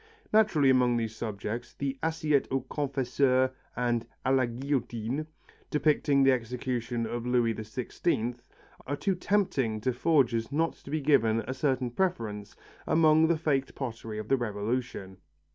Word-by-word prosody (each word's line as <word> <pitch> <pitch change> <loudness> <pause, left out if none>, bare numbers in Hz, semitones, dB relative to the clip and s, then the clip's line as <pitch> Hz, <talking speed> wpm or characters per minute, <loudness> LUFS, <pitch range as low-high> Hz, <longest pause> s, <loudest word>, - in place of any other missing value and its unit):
Naturally 185 -11 +5
among 125 -2 +3
these 110 -1 -2
subjects, 110 +2 -5
the 140 -1 -2
assiettes 155 -3 +1
au 135 0 0
confesseur 130 -1 +1 0.2
and 120 -2 0 0.2
à 130 +1 +3
la 130 -2 +3
guillotine, 125 +1 -2 0.4
depicting 150 -2 +2
the 135 - +6
execution 120 -1 -2
of 120 +1 -4
Louis 120 -2 +2
XVI, 115 +3 -2 0.5
are 145 - -1
too 195 +6 0
tempting 175 - 0
to 130 +3 0
forgers 125 -4 +2
not 165 +3 +1
to - - -15
be 155 +1 -1
given 115 -6 +3
a 120 +4 -4
certain 130 -3 0
preference 115 - -2 0.3
among 160 0 +5
the 165 0 +2
faked 140 -4 -1
pottery 115 -4 -5
of 110 0 -5
the 135 - +3
Revolution. 105 -3 -3
130 Hz, 145 wpm, -29 LUFS, 115-145 Hz, 0.5 s, the